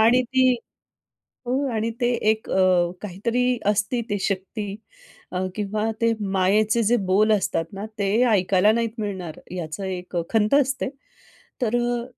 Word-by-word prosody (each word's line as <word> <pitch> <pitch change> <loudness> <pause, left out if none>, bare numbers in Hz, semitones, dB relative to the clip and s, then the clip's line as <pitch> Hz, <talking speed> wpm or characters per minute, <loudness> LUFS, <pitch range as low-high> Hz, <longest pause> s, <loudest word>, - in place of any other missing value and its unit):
आणि 240 +3 +5
ती 260 -1 +5 0.9
हो 265 +3 0
आणि 220 +1 0
ते 240 0 +2 0.2
एक 220 0 -2
अ, 180 -2 +3
काहीतरी 235 +6 0
असते 210 +4 +1
ती 205 - 0
शक्ती 195 +1 -3 0.6
अ, 180 - -1 0.2
किंवा 215 +1 -1
ते 230 0 +3 0.2
मायेचे 210 +4 +3
जे 235 +3 +3
बोल 215 +3 +4
असतात 190 -5 +1
ना, 195 +2 -6
ते 195 -1 0 0.2
ऐकायला 195 +1 +4
नाही 230 0 +1
मिळणार 190 -6 -4
याचं 175 +2 -5
एक 180 -1 -5
खंत 220 +2 +2
असते. 265 -1 -1 0.7
तर 240 0 +2
अ, 240 0 0
210 Hz, 145 wpm, -23 LUFS, 190-235 Hz, 0.9 s, आणि